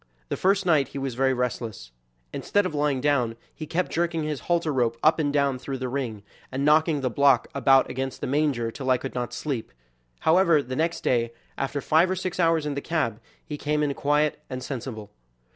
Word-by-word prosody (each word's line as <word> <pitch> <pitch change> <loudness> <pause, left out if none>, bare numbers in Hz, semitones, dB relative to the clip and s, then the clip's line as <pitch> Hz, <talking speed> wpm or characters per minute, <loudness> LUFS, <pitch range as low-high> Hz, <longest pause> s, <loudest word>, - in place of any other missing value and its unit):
The - - -1
first 195 +1 +2
night 155 -7 +3
he 140 - -8
was 135 -2 -3
very 130 +2 +2
restless. 115 - -3 0.4
Instead 205 -1 +1
of 185 - -3
lying 145 -3 0
down, 125 -5 +1 0.2
he 155 - -7
kept 175 +4 -1
jerking 170 -1 0
his 150 -2 -2
halter 170 -3 +1
rope 120 -3 +1
up 160 +1 +4
and 145 -2 +1
down 140 -3 +1
through 135 +1 -5
the 130 -1 -3
ring, 120 -6 -3 0.3
and 135 +2 -1
knocking 155 0 +4
the 130 - 0
block 140 -1 +3
about 135 0 +4
against 130 0 -4
the - - -3
manger 135 -5 0
till 130 +2 -5
I 130 - +5
could 135 +2 -6
not 120 -1 -3
sleep. 125 -2 -4 0.5
However, 165 -3 +4
the 130 0 -5
next 165 +3 -1
day, 115 -1 +1 0.2
after 140 +1 -2
five 160 +6 +3
or 185 - 0
six 185 0 -4
hours 165 -3 +3
in 150 - -1
the 140 - -3
cab, 145 -11 -1 0.3
he 150 -1 -6
came 150 0 0
in 145 -1 0
quiet 150 +2 +1
and 130 -1 -5
sensible. 120 -5 -6
140 Hz, 210 wpm, -25 LUFS, 130-155 Hz, 0.5 s, I